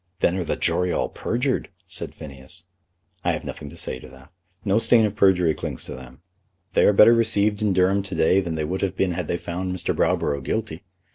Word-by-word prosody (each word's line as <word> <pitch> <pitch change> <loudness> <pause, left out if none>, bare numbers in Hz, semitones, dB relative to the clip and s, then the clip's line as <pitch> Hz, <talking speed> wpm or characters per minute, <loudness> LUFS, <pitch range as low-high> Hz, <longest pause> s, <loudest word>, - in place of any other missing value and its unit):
"Then 90 - +2
are 90 - -1
the - - -2
jury 90 0 +1
all - - -1
perjured," 125 +3 -2 0.2
said 90 - -6
Phineas. 70 +6 -11 0.6
"I - - +1
have - - -4
nothing 75 - -7
to - - -12
say 65 - -2
to - - -12
that. 65 +4 -17 0.3
No 100 +2 +3
stain 115 -1 +4
of 105 -1 -3
perjury 90 -5 +3
clings - - -5
to - - -6
them. 65 +3 -12 0.5
They - - +4
are - - +6
better 105 +3 +7
received 105 -3 +2
in 105 -2 +2
Durham 95 +2 +2
to 95 -2 -6
day 80 +4 +3
than 85 -3 -4
they 80 -1 -2
would 90 +5 -3
have 100 - -1
been 95 -2 +1
had 85 -2 -3
they 85 - -1
found 90 +2 -4
Mr. 90 -1 -2
Browborough 70 -1 0
guilty. 105 -2 -3
90 Hz, 220 wpm, -23 LUFS, 80-100 Hz, 0.6 s, better